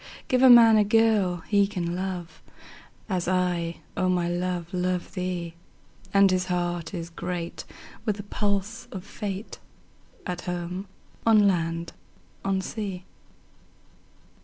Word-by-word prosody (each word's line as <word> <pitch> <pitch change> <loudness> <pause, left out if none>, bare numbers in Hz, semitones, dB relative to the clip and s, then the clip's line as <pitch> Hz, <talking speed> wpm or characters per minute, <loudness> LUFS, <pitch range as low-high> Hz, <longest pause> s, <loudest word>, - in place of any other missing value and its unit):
Give 255 0 +2
a 260 - +8
man 230 -2 +9
a 210 - +5
girl 205 -5 +2
he 200 -1 +4
can 175 -4 -3
love, 180 -2 -5 0.7
As 185 -5 -1
I, 175 -2 0
O 185 -1 +1
my 180 -1 +1
love, 175 0 -2
love 180 0 -1
thee; 180 -3 -3 0.6
10 200 - +4
And 195 - +6
his 185 0 +1
heart 175 -2 -2
is 170 -1 -5
great 175 0 -5 0.4
with 210 -3 0
the 205 - -7
pulse 205 +2 -2
of 190 -2 -6
Fate, 205 -1 -6 0.7
At 180 -1 -3
home, 180 +2 -4 0.4
on 215 -3 +6
land, 165 -2 -1 0.5
on 195 -1 0
sea. 190 -3 -5
185 Hz, 135 wpm, -26 LUFS, 175-200 Hz, 0.7 s, man